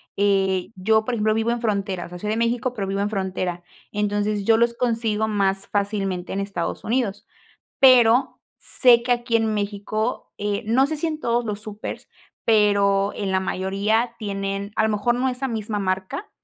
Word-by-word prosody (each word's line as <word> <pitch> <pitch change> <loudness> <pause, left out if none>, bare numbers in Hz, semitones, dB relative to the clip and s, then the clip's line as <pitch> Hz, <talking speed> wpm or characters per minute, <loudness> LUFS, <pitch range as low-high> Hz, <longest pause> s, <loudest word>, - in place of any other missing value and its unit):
eh, 195 -2 +1
yo, 220 +4 +2
por 245 +2 -2
ejemplo, 215 -1 +1
vivo 225 +1 0
en 235 0 0
frontera, 195 -5 -1
o - - -11
sea, 180 - -9
soy 210 - -4
de 220 - 0
México, 240 +2 0
pero 200 -4 -2
vivo 195 +1 -1
en 205 - 0
frontera. 185 -3 -3 0.3
Entonces 205 0 -1
yo 225 +1 +5
los 235 0 +2
consigo 225 -3 0
más 195 -2 0
fácilmente 200 -3 -2
en 195 - -2
Estados 195 -4 -3
Unidos. 220 -3 -1 0.5
Pero 250 -2 +5 0.2
sé 245 -3 +4
que 245 +1 +2
aquí 240 -1 0
en 220 -1 0
México, 210 +3 -3
eh, 205 +1 -2
no 250 +5 +3
sé 310 +1 -3
si 330 - -1
en 310 -1 -4
todos 235 0 0
los 210 -1 -4
súpers, 215 -1 -7 0.3
pero 200 -2 +3
en 200 -2 -2
la 190 - +2
mayoría 200 +5 0
tienen, 200 -1 -3
a - - +2
lo 220 - +2
mejor 215 +3 +1
no 260 +2 +1
esa 260 +1 -3
misma 215 -2 -3
marca, 190 - -3
210 Hz, 185 wpm, -23 LUFS, 195-235 Hz, 0.5 s, yo